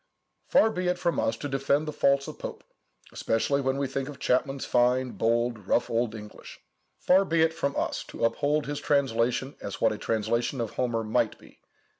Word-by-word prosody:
Far 220 - +4
be 180 -3 -2
it 180 0 +1
from 170 -1 0
us 115 - 0
to 145 - -4
defend 140 +2 0
the 150 - -3
faults 140 -1 +2
of - - -8
Pope, - - -7 0.5
especially 140 +5 0
when 130 0 0
we 140 - 0
think 135 +1 -3
of 145 - -9
Chapman's 135 +1 0
fine, 125 +1 +2
bold, 115 -2 0
rough 120 - +1
old 115 -1 0
English;—far 110 - -2
be 165 -3 +2
it 160 0 +2
from 140 -3 -2
us - - -2
to 115 - 0
hold 145 +6 0
up - - -10
his 145 0 -3
translation 130 -1 0
as 100 - -6
what 110 - +3
a 105 - -7
translation 115 +4 -1
of 115 -3 -2
Homer 120 -3 -1
might 110 0 0
be. - - -19
130 Hz, 195 wpm, -27 LUFS, 115-145 Hz, 0.5 s, Far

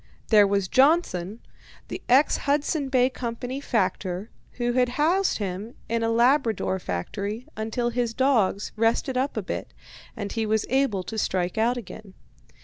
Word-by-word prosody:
There 210 -2 +6
was 200 -1 0
Johnson, 240 - +2 0.5
the - - -6
ex 265 +5 +5
Hudson 285 0 0
Bay 255 -1 +4
Company 250 +1 -5
factor, 190 -4 -1 0.2
who 240 -1 -1
had 250 0 +2
housed 355 +6 +2
him 200 +3 -5
in 230 0 -1
a 225 - +1
Labrador 235 -5 +2
factory 200 - -4
until 225 +2 -2
his 240 -1 -1
dogs 230 -7 +2
rested 230 +4 +1
up 265 +3 -1
a - - -1
bit, - - -5 0.4
and 200 -2 -4
he 225 -1 -1
was 220 0 +1
able 260 -8 +1
to 220 +3 -4
strike 185 0 -1
out 240 +3 +2
again. 215 -3 -9
230 Hz, 150 wpm, -25 LUFS, 200-260 Hz, 0.5 s, There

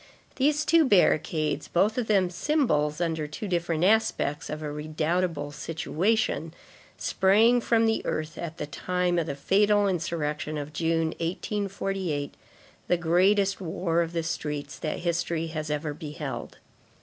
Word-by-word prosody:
These 295 +2 +2
two 330 -1 +5
barricades, 160 - +2
both 205 +5 +2
of 245 -3 -1
them 190 -4 +3
symbols, 170 - +1
under 160 -3 -1
two 150 +8 -6
different 170 -2 0
aspects, 185 -7 +1
of 155 0 -5
a 150 - -3
redoubtable 155 0 -1
situation, 165 +1 -1 0.4
sprang 220 +6 +4
from 230 -1 +3
the 225 0 +1
earth 155 0 -3
at 170 -1 -6
the - - -3
time 180 +3 -1
of 165 - -2
the 140 - -3
fatal 205 +7 +3
insurrection 155 -4 -2
of 150 +1 -6
June, 165 0 +1
1848, 190 -3 -2 0.5
the 180 - +3
greatest 190 +4 +2
war 170 -1 0
of 170 0 -3
the 165 -1 -1
streets 150 -3 -4
that 155 - -3
history 170 -1 -1
has 155 -1 -3
ever 150 0 -2
beheld. 150 -1 -6
170 Hz, 140 wpm, -27 LUFS, 155-195 Hz, 0.5 s, two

